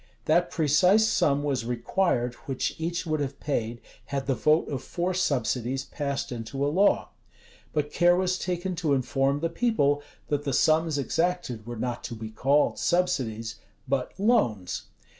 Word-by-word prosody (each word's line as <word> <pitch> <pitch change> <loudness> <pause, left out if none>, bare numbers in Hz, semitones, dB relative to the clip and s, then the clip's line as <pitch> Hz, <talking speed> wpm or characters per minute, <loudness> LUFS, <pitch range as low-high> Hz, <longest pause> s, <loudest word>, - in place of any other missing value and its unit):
That 175 +3 +3
precise 180 +8 +4
sum 145 -9 +2
was 135 -5 0
required 125 +1 0
which 135 -2 -1
each 170 +2 -2
would 155 -2 -1
have 140 -1 -3
paid, 120 -5 -2 0.2
had 140 -1 -3
the 135 - +1
vote 155 +5 +2
of 135 -4 -3
four 175 +7 -2
subsidies 130 -6 0
passed 140 -2 -3
into 125 +4 -3
a - - +2
law: 200 +4 +3 0.6
but 150 -1 -1
care 175 0 +5
was 185 0 0
taken 180 +1 -2
to 155 -5 +2
inform 135 +2 0
the 165 - +1
people, 165 -8 +1 0.3
that 145 -1 0
the 140 -2 -2
sums 155 +2 +3
exacted 140 -6 -1
were 120 -1 -5
not 120 +1 -3
to 120 - -5
be 110 0 -7
called 140 +6 +2
subsidies, 115 -11 0 0.3
but 135 -1 -1
loans. 120 - +1
145 Hz, 160 wpm, -27 LUFS, 125-175 Hz, 0.6 s, care